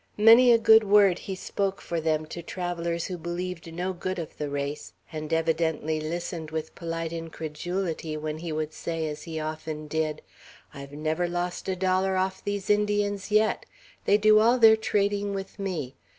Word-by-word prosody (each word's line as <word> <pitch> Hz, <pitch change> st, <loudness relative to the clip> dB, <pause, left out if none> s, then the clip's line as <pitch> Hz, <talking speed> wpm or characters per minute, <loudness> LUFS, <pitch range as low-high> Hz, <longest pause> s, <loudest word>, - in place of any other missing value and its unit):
Many 230 Hz, +4 st, +8 dB
a 235 Hz, -, +7 dB
good 220 Hz, 0 st, +6 dB
word 200 Hz, -3 st, +5 dB
he 190 Hz, -, -5 dB
spoke 195 Hz, +1 st, -2 dB
for 170 Hz, -1 st, -3 dB
them 155 Hz, -1 st, 0 dB
to 170 Hz, +2 st, -7 dB
travellers 170 Hz, -1 st, -3 dB
who 180 Hz, -2 st, -5 dB
believed 175 Hz, 0 st, -5 dB
no 180 Hz, +3 st, -3 dB
good 185 Hz, +1 st, -4 dB
of 165 Hz, -3 st, -6 dB
the 150 Hz, -1 st, -2 dB
race, 140 Hz, +1 st, -4 dB, 0.2 s
and 155 Hz, -1 st, -6 dB
evidently 160 Hz, -1 st, 0 dB
listened 165 Hz, 0 st, -4 dB
with 160 Hz, 0 st, -4 dB
polite 165 Hz, -1 st, -4 dB
incredulity 165 Hz, 0 st, -4 dB
when 155 Hz, 0 st, -4 dB
he 170 Hz, 0 st, -5 dB
would 155 Hz, 0 st, -3 dB
say, 165 Hz, -1 st, -3 dB
as 150 Hz, -1 st, -5 dB
he 160 Hz, -2 st, -5 dB
often 155 Hz, 0 st, -5 dB
did: 155 Hz, 0 st, -2 dB, 0.5 s
"I've 140 Hz, 0 st, -9 dB
never 155 Hz, +4 st, -1 dB
lost 175 Hz, +2 st, -3 dB
a 190 Hz, -, 0 dB
dollar 185 Hz, +1 st, +1 dB
off 190 Hz, 0 st, -1 dB
these 205 Hz, -1 st, -3 dB
Indians 205 Hz, -1 st, +1 dB
yet. 215 Hz, +1 st, +2 dB, 0.4 s
They 205 Hz, -, +5 dB
do 215 Hz, 0 st, +6 dB
all 235 Hz, +3 st, +4 dB
their 225 Hz, -2 st, +8 dB
trading 205 Hz, -2 st, 0 dB
with 195 Hz, +1 st, -7 dB
me. 170 Hz, -10 st, -3 dB
175 Hz, 175 wpm, -27 LUFS, 160-195 Hz, 0.5 s, Many